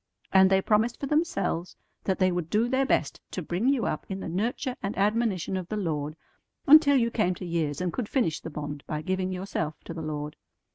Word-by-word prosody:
And 190 0 +7
they 190 0 +3
promised 225 +2 +2
for - - -3
themselves 200 - 0 0.3
that 190 - +1
they 185 -1 +3
would 175 -2 -2
do 220 +5 +2
their 265 +1 +1
best 145 - 0
to 185 - -4
bring 180 - 0
you 270 -4 +2
up - - -2
in 190 0 -3
the - - -5
nurture 235 - -2
and 200 +2 -3
admonition 205 -3 +1
of 185 -2 -3
the 215 - -2
Lord 155 -6 -2 0.5
until 285 -1 +8
you 235 -2 +2
came 185 -6 +1
to 180 - -7
years 165 -4 -1
and 180 -1 -1
could 240 -5 -3
finish 230 - +1
the - - -7
bond 145 -2 -6
by 155 0 -3
giving 185 +2 -1
yourself 180 -4 -3
to - - -7
the 165 - -6
Lord. 150 -1 -4
190 Hz, 220 wpm, -27 LUFS, 165-230 Hz, 0.5 s, until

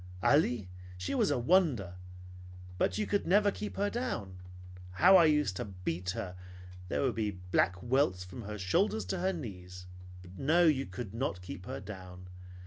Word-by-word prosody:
Ali, 120 - +3 0.3
she 90 0 -3
was - - +2
a - - +1
wonder! 125 - +2 0.9
But 90 0 +1
you 105 - 0 0.2
never 205 +3 +4
could - - -11
keep 210 - -5
her 205 +1 0
down. 100 - -4 0.5
How 185 - +6
I 175 -3 +8
used 150 -11 +2
to - - -3
beat 90 -2 -4
her! 90 -1 -5 0.5
She - - -1
would 130 -3 +1
be 110 -1 -1 0.2
black 90 0 +2
welts 120 -8 +1
from 90 +6 -9
her 105 0 -6
shoulders 105 - +1
to 95 - -3
her 190 +2 +1
knees. 90 - -8 0.5
No, 160 - +3
you 140 -4 +2
could 95 +2 -7
not 115 -7 -3
keep 90 +1 -8
her - - -5
down. 90 -2 -10
105 Hz, 170 wpm, -31 LUFS, 90-150 Hz, 0.9 s, I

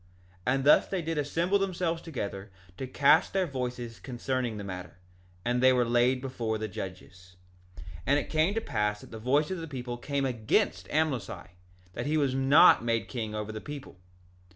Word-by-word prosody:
2:6 - - -29 0.2
And 135 - -1
thus 145 - +6
they 185 -3 -2
did 160 -1 -2
assemble 170 +7 +1
themselves 175 -3 -1
together 100 - -5 0.3
to 130 - -5
cast 145 +8 +4
in - - +3
their 185 - +2
voices 125 -5 -5
concerning 125 -2 -3
the 100 - -5
matter; 90 -3 -7 0.5
and 120 +1 +1
they 130 0 +7
were 125 -1 +3
laid 120 +2 +2
before 120 -4 -2
the 110 0 -3
judges. 90 -3 -9 0.4
2:7 - - -10 0.2
And 140 +2 +4
it - - -2
came 160 +6 +1
to 225 - 0
pass 105 - -1
that - - -14
the 110 - -7
voice 140 +8 +1
of 185 - -3
the 165 - -6
people 125 -4 -5
came 140 +1 -1
against 110 -6 0
Amlici, 135 - -1 0.4
that - - -4
he 155 +1 +1
was 140 -4 +1
not 135 +3 +6
made 115 -1 0
king 110 -4 -4
over 105 0 -4
the 110 0 -6
people. 145 -8 -9
130 Hz, 195 wpm, -29 LUFS, 110-150 Hz, 0.5 s, they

